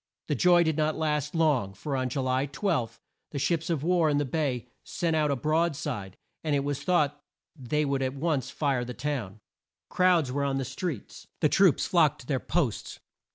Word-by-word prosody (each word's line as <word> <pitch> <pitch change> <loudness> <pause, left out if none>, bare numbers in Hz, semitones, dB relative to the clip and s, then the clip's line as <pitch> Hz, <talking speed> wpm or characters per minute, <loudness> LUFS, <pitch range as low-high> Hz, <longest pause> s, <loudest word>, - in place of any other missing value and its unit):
The - - +2
joy 175 +5 +5
did 160 -2 0
not 155 0 +1
last 150 -1 -1
long, 140 -12 +2
for 135 +8 -4
on 130 -1 -1
Ju 135 +2 -2
ly 130 +2 0
12, 135 - -2 0.3
the 145 - -6
ships 165 +4 0
of 160 -4 -1
war 170 -2 +3
in 145 - +2
the 145 - +1
bay 130 -4 -1 0.2
sent 165 -2 -1
out 155 -1 +2
a 140 - +1
broad 155 +5 +1
side, 120 - -5 0.3
and 155 -2 +1
it 140 - +1
was 145 -1 -2
thought 150 -5 +1 0.3
they 150 +2 -1
would 140 -1 0
at 130 0 -1
once 140 -3 -1
fire 135 -4 0
the 125 0 -6
town. 120 -9 -4 0.5
Crowds 175 -7 +3
were 140 +2 -1
on 135 -1 0
the 135 - -2
streets. 165 - -5
The - - +4
troops - - +4
flocked - - +3
to - - -14
their - - 0
posts. - - -2
145 Hz, 200 wpm, -28 LUFS, 130-160 Hz, 0.5 s, joy